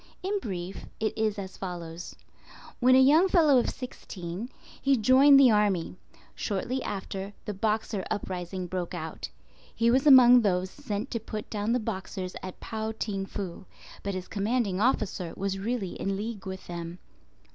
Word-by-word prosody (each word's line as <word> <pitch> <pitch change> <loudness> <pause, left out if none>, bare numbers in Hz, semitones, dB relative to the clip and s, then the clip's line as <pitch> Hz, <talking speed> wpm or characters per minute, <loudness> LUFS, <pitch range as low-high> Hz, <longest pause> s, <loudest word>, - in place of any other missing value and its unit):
In 400 +2 0
brief, 185 - -6
it 220 -1 -1
is 220 -1 0
as 190 -1 -7
follows:—When 180 +7 -3
a - - +7
young 300 +8 +6
fellow 310 -8 +5
of - - 0
sixteen, 195 -4 -7 0.3
he 275 -1 +3
joined 265 +5 +7
the 260 -3 +7
army. 205 -6 +1 0.4
Shortly 235 +6 -2
after, 195 0 -5
the 210 - -3
Boxer 210 0 -1
Uprising 185 -1 -4
broke 180 -1 -4
out. 155 - -6 0.5
He 230 0 +3
was 265 +4 +3
among 250 -3 +9
those 185 -3 0
sent 225 -4 -5
to 230 - -1
put 215 -1 -7
down 210 +2 0
the 250 - +2
Boxers 190 -4 -5
at 185 -1 -8
Pao 220 0 -4
ting 195 -3 -3
fu, 190 -2 -6 0.4
but 200 -1 -3
his 185 -1 -5
commanding 210 -2 0
officer 200 -8 0
was 195 0 -2
really 205 -2 -2
in 195 0 -1
league 210 -1 -5
with 190 0 -6
them. 170 0 -6
205 Hz, 155 wpm, -28 LUFS, 185-240 Hz, 0.5 s, among